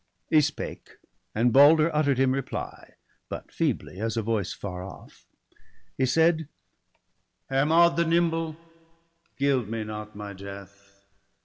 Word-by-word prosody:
He 155 - +6
spake; 145 0 -5 0.4
and 115 +2 +2
Balder 155 +3 +6
utter'd 145 -3 +2
him 130 0 +3
reply, 135 0 -5 0.3
But - - -7
feebly, 95 - -2
as 115 +1 -2
a 115 - 0
voice 105 -4 -1
far 90 -2 -6
off; 95 - -13 0.7
he 130 - +1
said: 160 +3 +2 0.3
— - - -46
' - - -50
Hermod 165 +5 +4
the 170 - +3
nimble, 165 -1 +1 0.8
gild 135 -6 +1
me 115 -1 -3
not 105 0 -7
my 105 -1 -7
death 100 0 -12
130 Hz, 135 wpm, -26 LUFS, 105-155 Hz, 0.8 s, He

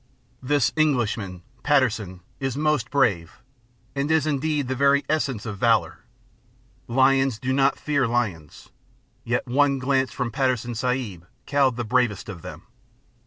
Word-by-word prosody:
This 130 -4 +1
Englishman, 115 - 0 0.2
Patterson, 110 -10 +1 0.2
is 135 -1 -3
most 150 -6 0
brave, 100 -12 0 0.5
and 140 +1 -2
is 160 -2 +2
indeed 150 -1 -1
the 130 - -1
very 140 +2 +3
essence 135 -8 -1
of 105 -3 -6
valour; 115 -1 +2 0.9
Lions 135 0 +3
do 130 +3 -2
not 135 0 +2
fear 140 -4 0
lions, 105 -11 -3 0.5
yet 120 +2 -1
one 140 +2 +2
glance 130 -1 0
from 120 -1 -3
Patterson 125 -1 -1
Sahib 115 -8 -3 0.2
cowed 140 -3 +2
the 120 0 -3
bravest 115 -3 0
of 90 -5 -8
them. 80 +2 -9
130 Hz, 135 wpm, -24 LUFS, 110-140 Hz, 0.9 s, very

